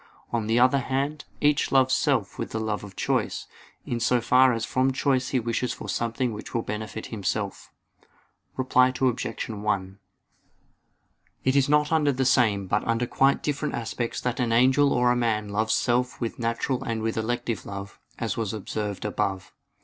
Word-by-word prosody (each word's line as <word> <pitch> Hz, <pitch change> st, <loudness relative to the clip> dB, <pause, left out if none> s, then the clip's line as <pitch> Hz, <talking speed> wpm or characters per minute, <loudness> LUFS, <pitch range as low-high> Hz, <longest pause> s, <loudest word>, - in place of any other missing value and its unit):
On 115 Hz, -2 st, 0 dB
the 115 Hz, +1 st, +2 dB
other 130 Hz, +3 st, +5 dB
hand, 140 Hz, +3 st, -2 dB, 0.2 s
each 150 Hz, 0 st, +2 dB
loves 130 Hz, -1 st, +4 dB
self -, -, +1 dB
with -, -, -3 dB
the 110 Hz, -, -1 dB
love 110 Hz, -2 st, -2 dB
of 100 Hz, -2 st, -10 dB
choice, -, -, -1 dB, 0.4 s
in 120 Hz, -, -2 dB
so 120 Hz, +1 st, +2 dB
far 125 Hz, +2 st, +5 dB
as 115 Hz, -1 st, -1 dB
from 130 Hz, +1 st, +1 dB
choice 130 Hz, -1 st, +1 dB
he 130 Hz, -, +1 dB
wishes 120 Hz, +1 st, -1 dB
for -, -, -8 dB
something 115 Hz, +1 st, -1 dB
which 105 Hz, -, -8 dB
will 115 Hz, -, 0 dB
benefit 110 Hz, 0 st, -5 dB
himself. 100 Hz, -4 st, -3 dB, 0.9 s
Reply 130 Hz, 0 st, +4 dB
Obj. 125 Hz, -3 st, 0 dB
1: 100 Hz, -3 st, -2 dB, 1.4 s
It 130 Hz, +1 st, +2 dB
is 140 Hz, 0 st, +3 dB
not 150 Hz, +1 st, +3 dB
under 155 Hz, -3 st, +3 dB
the 130 Hz, 0 st, -1 dB
same 110 Hz, -6 st, +3 dB
but 105 Hz, +3 st, 0 dB
under 115 Hz, +1 st, +1 dB
quite 135 Hz, +3 st, +2 dB
different 150 Hz, 0 st, -2 dB
aspects 115 Hz, 0 st, -3 dB
that 125 Hz, 0 st, -2 dB
an 120 Hz, -2 st, +1 dB
angel 130 Hz, +4 st, +4 dB
or 125 Hz, 0 st, +3 dB
a -, -, +2 dB
man 110 Hz, -3 st, 0 dB
loves 110 Hz, +2 st, +1 dB
self 125 Hz, +1 st, 0 dB
with 115 Hz, 0 st, -4 dB
natural 115 Hz, +2 st, -1 dB
and 115 Hz, -1 st, -3 dB
with 110 Hz, 0 st, -1 dB
elective 115 Hz, -1 st, -2 dB
love, 100 Hz, 0 st, -8 dB, 0.2 s
as -, -, -2 dB
was 110 Hz, -2 st, -2 dB
observed 105 Hz, -1 st, -4 dB
above. 95 Hz, -2 st, -2 dB
120 Hz, 175 wpm, -26 LUFS, 110-130 Hz, 1.4 s, other